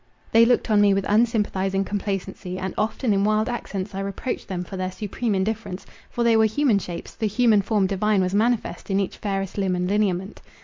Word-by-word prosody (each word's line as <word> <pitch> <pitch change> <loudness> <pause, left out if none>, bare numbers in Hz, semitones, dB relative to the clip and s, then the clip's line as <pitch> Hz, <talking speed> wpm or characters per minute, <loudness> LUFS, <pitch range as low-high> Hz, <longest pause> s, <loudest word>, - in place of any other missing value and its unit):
They 230 +1 +6
looked 245 -1 +2
on 210 -1 +5
me 200 -1 +5
with 195 - -1
unsympathizing 205 -3 +1
complacency, 195 -2 -4
and 190 0 -4
often 220 +1 0
in 195 0 +2
wild 215 +1 +2
accents 210 -5 -4
I 195 - -4
reproached 200 +6 -4
them 180 -2 -3
for 190 - -8
their 185 0 -3
supreme 210 +2 -2
indifference—for 205 +3 -4
they 230 -1 +4
were 220 0 +5
human 220 -1 +2
shapes, 175 -2 -7
the 220 - -1
human 215 0 +3
form 200 0 +1
divine 200 +2 +1
was 185 0 -1
manifest 225 +2 0
in 195 0 +2
each 195 - -2
fairest 195 -1 -3
limb 190 -2 +1
and 180 0 -1
lineament. 195 -1 -1
200 Hz, 200 wpm, -23 LUFS, 190-220 Hz, -, They